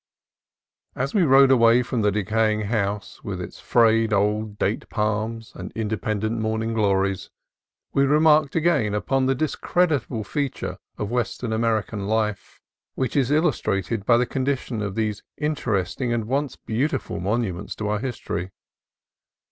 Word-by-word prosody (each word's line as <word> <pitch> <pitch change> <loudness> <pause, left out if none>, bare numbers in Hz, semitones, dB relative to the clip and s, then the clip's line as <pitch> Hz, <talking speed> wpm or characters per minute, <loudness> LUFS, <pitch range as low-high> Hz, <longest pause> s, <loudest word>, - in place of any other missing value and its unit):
As 135 +2 -2
we 205 - +3
rode 135 -3 +6
away 120 -1 +5
from 120 -1 -2
the 105 -1 +3
decaying 110 +1 +1
house, 105 -2 -2
with - - -4
its - - -7
frayed 115 -1 +3
old 105 +1 0
date 105 +2 -1
palms 110 +1 -2
and - - -8
independent 110 +1 -2
morning 110 +1 -1
glories, 100 -3 +1 0.6
we 140 0 +3
remarked 150 0 +4
again 155 -11 +2
upon 130 +5 +1
the 135 - +2
discreditable 150 -4 0
feature 140 +5 -3 0.2
of 105 +1 -3
Western 120 -1 -2
American 110 -3 -1
life 105 -2 -2 0.4
which 130 - -2
is 135 -3 +2
illustrated 120 - 0
by 120 +3 +4
the 125 - +2
condition 130 -3 -2
of 100 -2 -3
these 110 -2 -1 0.2
interesting 125 - -1
and 115 -2 0
once 135 +3 -1
beau 120 +6 -1
tiful 130 - -4
monuments 95 -1 -2
of 105 - -2
our 105 0 0
history. 100 -7 -4
115 Hz, 140 wpm, -24 LUFS, 105-130 Hz, 0.6 s, rode